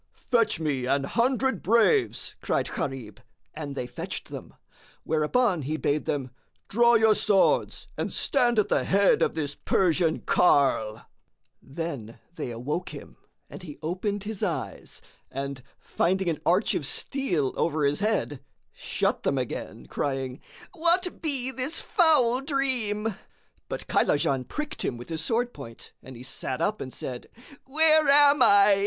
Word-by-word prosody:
"Fetch 230 Hz, -7 st, +1 dB
me 140 Hz, -6 st, -1 dB
an 140 Hz, +1 st, +1 dB
hundred 250 Hz, -, 0 dB
braves!" 235 Hz, -, +2 dB
cried -, -, 0 dB
Gharib, 125 Hz, -7 st, -5 dB, 0.3 s
and 145 Hz, -3 st, -6 dB
they 125 Hz, -, -3 dB
fetched 125 Hz, -, -6 dB
them; -, -, -9 dB, 0.5 s
whereupon 165 Hz, +5 st, +1 dB
he 150 Hz, +3 st, -3 dB
bade 150 Hz, 0 st, -1 dB
them, 135 Hz, -4 st, -2 dB, 0.4 s
"Draw 235 Hz, +2 st, +4 dB
your 220 Hz, -1 st, +5 dB
swords 205 Hz, -2 st, +2 dB
and -, -, -2 dB
stand 245 Hz, -4 st, +1 dB
at 210 Hz, -, +3 dB
the -, -, +1 dB
head 200 Hz, 0 st, +3 dB
of -, -, +1 dB
this 145 Hz, -3 st, -2 dB
Persian 170 Hz, -2 st, +1 dB
carle!" 115 Hz, -9 st, +2 dB, 0.6 s
Then 135 Hz, -7 st, -6 dB, 0.2 s
they 150 Hz, -, -5 dB
awoke 130 Hz, +10 st, -4 dB
him -, -, -10 dB, 0.3 s
and -, -, -10 dB
he 155 Hz, -5 st, -10 dB
opened 195 Hz, +5 st, -2 dB
his 210 Hz, -1 st, -6 dB
eyes; -, -, -4 dB, 0.3 s
and, 135 Hz, 0 st, -5 dB, 0.2 s
finding 190 Hz, +1 st, 0 dB
an 160 Hz, -, -3 dB
arch 185 Hz, +5 st, +3 dB
of 140 Hz, -, -2 dB
steel 175 Hz, -, -1 dB
over 155 Hz, -3 st, 0 dB
his 140 Hz, +1 st, +1 dB
head, 205 Hz, -, -1 dB, 0.3 s
shut -, -, -2 dB
them -, -, 0 dB
again, -, -, -5 dB
crying, 135 Hz, -2 st, -3 dB, 0.3 s
"What 350 Hz, +1 st, +2 dB
be 270 Hz, -5 st, -1 dB
this 265 Hz, +5 st, -3 dB
foul 270 Hz, -, +3 dB
dream?" 245 Hz, -7 st, -1 dB, 0.6 s
But -, -, -5 dB
Kaylajan 135 Hz, -3 st, +1 dB
pricked 300 Hz, +1 st, -5 dB
him 120 Hz, -, -2 dB
with 120 Hz, -, -11 dB
his 160 Hz, -1 st, -2 dB
sword 240 Hz, +4 st, 0 dB
point 115 Hz, 0 st, -11 dB
and 130 Hz, -, -11 dB
he 120 Hz, -, -10 dB
sat 130 Hz, 0 st, -4 dB
up 210 Hz, +1 st, -1 dB
and 130 Hz, -, -6 dB
said, 125 Hz, -1 st, -6 dB, 0.4 s
"Where 310 Hz, +2 st, +4 dB
am 285 Hz, 0 st, +6 dB
I?" 200 Hz, -2 st, +6 dB
185 Hz, 150 wpm, -26 LUFS, -, 0.6 s, am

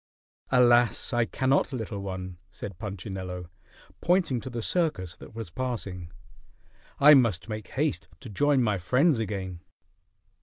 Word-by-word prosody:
"Alas! 120 Hz, 0 st, +4 dB
I 120 Hz, -1 st, +3 dB
cannot, 135 Hz, +4 st, +1 dB
little 110 Hz, -5 st, -4 dB
one," 95 Hz, -2 st, -6 dB
said 90 Hz, 0 st, -8 dB
Punchinello, 95 Hz, -4 st, -6 dB, 0.5 s
pointing 170 Hz, -9 st, +2 dB
to 130 Hz, -, -7 dB
the 115 Hz, -2 st, -4 dB
circus 130 Hz, -, -1 dB
that -, -, -13 dB
was 115 Hz, -7 st, -6 dB
passing. 100 Hz, -7 st, -4 dB, 0.9 s
"I 150 Hz, +2 st, +9 dB
must 115 Hz, -, +3 dB
make 110 Hz, -1 st, -5 dB
haste 150 Hz, +2 st, -1 dB
to 130 Hz, -, -9 dB
join 135 Hz, +5 st, +2 dB
my 105 Hz, -4 st, +1 dB
friends 130 Hz, -, +3 dB
again." 95 Hz, -5 st, -4 dB
110 Hz, 130 wpm, -27 LUFS, 95-130 Hz, 0.9 s, I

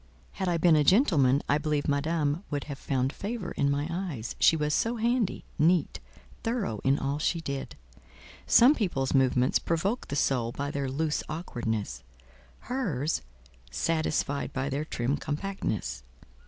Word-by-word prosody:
Had 190 Hz, -2 st, -2 dB
I 170 Hz, -, +1 dB
been 165 Hz, -1 st, +5 dB
a 150 Hz, -, +4 dB
gentleman 145 Hz, -, +4 dB
I 145 Hz, -, +2 dB
believe 150 Hz, -1 st, -1 dB
Madame 150 Hz, +2 st, 0 dB
would 145 Hz, -2 st, -2 dB
have 140 Hz, -1 st, -7 dB
found 130 Hz, 0 st, -1 dB
favour 210 Hz, 0 st, -4 dB
in 140 Hz, -, +1 dB
my 145 Hz, +1 st, 0 dB
eyes, 170 Hz, -, -4 dB
she -, -, +6 dB
was 150 Hz, -1 st, 0 dB
so 230 Hz, +8 st, +1 dB
handy, 235 Hz, -1 st, 0 dB
neat, 165 Hz, 0 st, +2 dB, 0.4 s
thorough 225 Hz, -, -2 dB
in 135 Hz, +1 st, +3 dB
all 140 Hz, +2 st, -2 dB
she 165 Hz, +2 st, 0 dB
did: 140 Hz, -4 st, -5 dB, 0.7 s
some 250 Hz, +5 st, +7 dB
people's 175 Hz, -, -1 dB
movements 130 Hz, -2 st, +3 dB
provoke 190 Hz, +8 st, -1 dB
the 145 Hz, -, -4 dB
soul 125 Hz, -4 st, +1 dB
by 140 Hz, +1 st, -3 dB
their 140 Hz, -2 st, -2 dB
loose 150 Hz, +3 st, -1 dB
awkwardness, 110 Hz, -, -3 dB, 0.6 s
hers—satisfied 140 Hz, -, -2 dB
by 135 Hz, +1 st, -2 dB
their 145 Hz, +3 st, -2 dB
trim 130 Hz, -1 st, -1 dB
compactness. 155 Hz, -, -3 dB
145 Hz, 145 wpm, -28 LUFS, 135-175 Hz, 0.7 s, some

